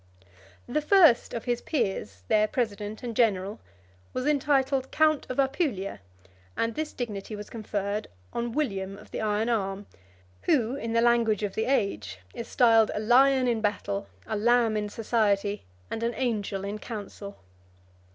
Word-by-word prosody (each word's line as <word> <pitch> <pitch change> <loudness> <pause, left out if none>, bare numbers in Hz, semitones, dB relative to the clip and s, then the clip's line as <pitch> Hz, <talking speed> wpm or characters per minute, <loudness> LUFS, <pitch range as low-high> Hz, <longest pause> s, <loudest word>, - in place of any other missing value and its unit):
The 305 +5 0
first 325 -6 +5
of 230 - -5
his 240 -1 0
peers, 190 - -2
their 215 0 +4
president 215 -2 -3
and 235 -2 -4
general, 205 -3 +1 0.5
was 255 - -2
entitled 275 -2 +2
count 310 -1 +2
of 255 - -4
Apulia; 265 - 0 0.6
and 230 0 0
this 310 +3 -3
dignity 215 -3 -5
was 210 0 -9
conferred 205 -2 -3 0.3
on 235 0 -2
William 195 -8 -2
of - - -15
the - - -3
iron 215 +1 0
arm, 200 -3 -1 0.6
who, 250 -4 +2
in 230 -4 -4
the 230 - +3
language 230 -3 +3
of 200 -2 -2
the 220 - -1
age, 200 - 0 0.2
is 230 - -6
styled 225 -3 +5
a - - -1
lion 255 +4 +5
in 230 -2 +1
battle, 200 - -1 0.2
a 220 - -3
lamb 230 +1 +3
in 210 -1 -1
society, 210 -2 0 0.3
and 225 - -3
an 235 +1 -1
angel 210 -5 -2
in 205 +2 -4
council. 205 -3 -7
225 Hz, 155 wpm, -27 LUFS, 205-245 Hz, 0.6 s, first